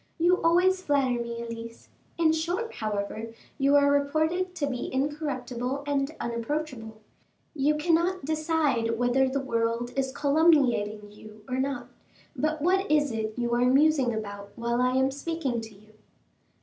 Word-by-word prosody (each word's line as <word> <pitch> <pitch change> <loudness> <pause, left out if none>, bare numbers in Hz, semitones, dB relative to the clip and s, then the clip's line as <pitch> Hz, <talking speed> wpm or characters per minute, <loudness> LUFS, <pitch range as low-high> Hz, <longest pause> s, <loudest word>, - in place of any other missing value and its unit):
"You 350 +2 +3
always 365 +3 +3
flatter 270 -7 +1
me, 235 0 -5
Elise. 230 0 -8 0.3
In 325 -2 +4
short, 350 +9 -2
however, 215 +1 -4 0.2
you 275 +1 +4
are 285 0 +5
reported 315 +6 0
to 295 - -1
be 255 -3 -4
incorruptible 270 -2 -2
and 285 +1 -1
unapproachable. 235 -2 -4 0.5
You 300 0 +2
cannot 340 +2 +1
decide 305 -7 0
whether 245 +2 +2
the 275 +1 -1
world 230 -2 -1
is 265 -1 0
calumniating 270 -9 +2
you 215 0 -14
or 255 0 -2
not; 270 -1 -2 0.5
but 310 -1 -1
what 380 +3 +2
is 295 -2 +3
it 220 0 -3
you 240 -1 -1
are 240 +1 +2
musing 275 -1 +4
about 205 -2 -6
while 235 +1 -1
I 250 0 +2
am 265 +1 +2
speaking 280 -4 -3
to 220 -2 -11
you?" 215 +2 -20
270 Hz, 150 wpm, -27 LUFS, 235-310 Hz, 0.5 s, are